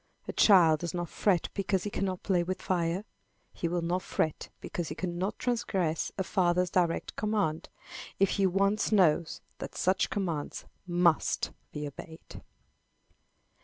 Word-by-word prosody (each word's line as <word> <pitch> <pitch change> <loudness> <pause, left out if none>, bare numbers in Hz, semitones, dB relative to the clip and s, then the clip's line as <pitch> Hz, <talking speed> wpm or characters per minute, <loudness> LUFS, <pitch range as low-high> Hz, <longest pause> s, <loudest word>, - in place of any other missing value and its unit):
A - - -4
child 170 -7 +6
does 170 +1 -4
not 175 -2 -3
fret 185 -5 +1
because 195 -2 0
he 205 - -4
cannot 190 -2 -2
play 185 -3 +2
with 185 +2 -3
fire. 175 +2 -1 0.5
He 170 - -2
will 175 0 -1
not 175 +2 0
fret 155 -3 -2
because 175 -2 -4
he 155 - -5
cannot 180 +3 -3
transgress 195 -9 -1
a 190 - 0
father's 180 -1 +1
direct 175 -2 0
command, 205 -7 -1 0.5
if 195 -1 +4
he 195 -2 +2
once 200 +4 +1
knows 170 -5 +3 0.2
that - - -7
such 185 +1 +1
commands 170 -8 -3 0.2
must 175 -2 +2 0.2
be 150 0 -4
obeyed. 160 +3 -10
180 Hz, 145 wpm, -30 LUFS, 170-195 Hz, 0.5 s, child